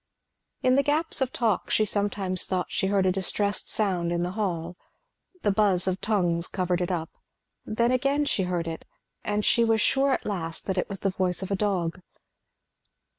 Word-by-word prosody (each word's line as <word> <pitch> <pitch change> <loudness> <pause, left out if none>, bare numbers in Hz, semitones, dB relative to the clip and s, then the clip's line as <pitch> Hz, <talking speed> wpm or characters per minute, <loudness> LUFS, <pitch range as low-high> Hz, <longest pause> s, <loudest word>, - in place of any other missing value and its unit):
In 255 - +4
the 275 - +5
gaps 300 +1 0
of 260 -1 +1
talk 220 -6 0
she 215 - +3
sometimes 200 -2 0
thought 185 -1 -2
she 190 - 0
heard 195 -1 +2
a 185 - +4
distressed 195 +2 +1
sound 180 -5 +1
in 175 0 0
the 180 - -2
hall. 180 -4 -3 0.7
The 205 - +3
buzz 195 -3 +2
of 190 0 -1
tongues 175 -5 0
covered 180 -2 -1
it 180 - -1
up, 165 -3 -3 0.6
then 235 +3 +1
again 275 +3 +1
she 210 - +1
heard 175 -2 -2
it, 165 -1 -5 0.4
and 210 0 -1
she 235 - +4
was 225 -1 +3
sure 270 +5 +3
at - - -1
last 165 -5 -4
that 190 -1 -1
it - - -2
was 195 -1 -5
the 195 - +1
voice 185 0 -1
of 190 - -6
a - - +2
dog. 185 -4 -1
195 Hz, 190 wpm, -26 LUFS, 180-215 Hz, 0.7 s, the